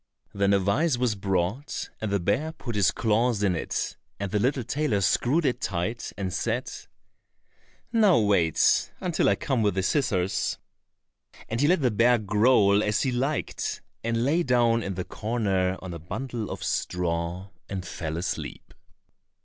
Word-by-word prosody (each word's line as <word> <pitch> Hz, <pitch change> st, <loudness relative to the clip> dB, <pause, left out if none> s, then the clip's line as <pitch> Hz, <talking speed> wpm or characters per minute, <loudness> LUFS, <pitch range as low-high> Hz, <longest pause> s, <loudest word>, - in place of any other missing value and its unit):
Then 100 Hz, 0 st, +2 dB
a 100 Hz, -, +5 dB
vise 120 Hz, -, +1 dB
was 125 Hz, -2 st, +1 dB
brought, 95 Hz, +6 st, -2 dB
and 110 Hz, -, -2 dB
the 100 Hz, -, +2 dB
bear 125 Hz, -, 0 dB
put 120 Hz, -7 st, -6 dB
his 100 Hz, -4 st, +3 dB
claws 110 Hz, +2 st, +1 dB
in 95 Hz, -3 st, +2 dB
it, -, -, -3 dB, 0.2 s
and 100 Hz, -1 st, -3 dB
the 105 Hz, -, +1 dB
little 130 Hz, +3 st, +1 dB
tailor 125 Hz, -3 st, 0 dB
screwed 125 Hz, -, +2 dB
it 130 Hz, -, 0 dB
tight, 95 Hz, +6 st, -2 dB
and 95 Hz, -3 st, -3 dB
said, 115 Hz, +5 st, -2 dB, 1.2 s
"Now 210 Hz, -6 st, +5 dB
wait 100 Hz, -7 st, +3 dB
until 180 Hz, -4 st, +1 dB
I -, -, +3 dB
come 130 Hz, -4 st, -1 dB
with 105 Hz, -3 st, +1 dB
the 95 Hz, -, 0 dB
scissors," 100 Hz, -4 st, 0 dB, 0.9 s
and 115 Hz, +3 st, -1 dB
he 145 Hz, -, +4 dB
let 175 Hz, -1 st, +3 dB
the 125 Hz, -, +3 dB
bear 120 Hz, +3 st, +4 dB
growl 105 Hz, -1 st, +4 dB
as 105 Hz, 0 st, +1 dB
he 130 Hz, -, 0 dB
liked, 135 Hz, +5 st, -2 dB, 0.2 s
and 115 Hz, +1 st, 0 dB
lay 160 Hz, +6 st, +2 dB
down 120 Hz, -5 st, +3 dB
in 95 Hz, -3 st, -4 dB
the 90 Hz, -, -4 dB
corner 100 Hz, -5 st, -1 dB
on 90 Hz, -2 st, -6 dB
a 85 Hz, -, -6 dB
bundle 115 Hz, -, -5 dB
of -, -, -6 dB
straw, 90 Hz, +2 st, -2 dB, 0.2 s
and 95 Hz, -2 st, -4 dB
fell 80 Hz, -3 st, -4 dB
asleep. 90 Hz, +2 st, -5 dB
105 Hz, 165 wpm, -26 LUFS, 95-125 Hz, 1.2 s, a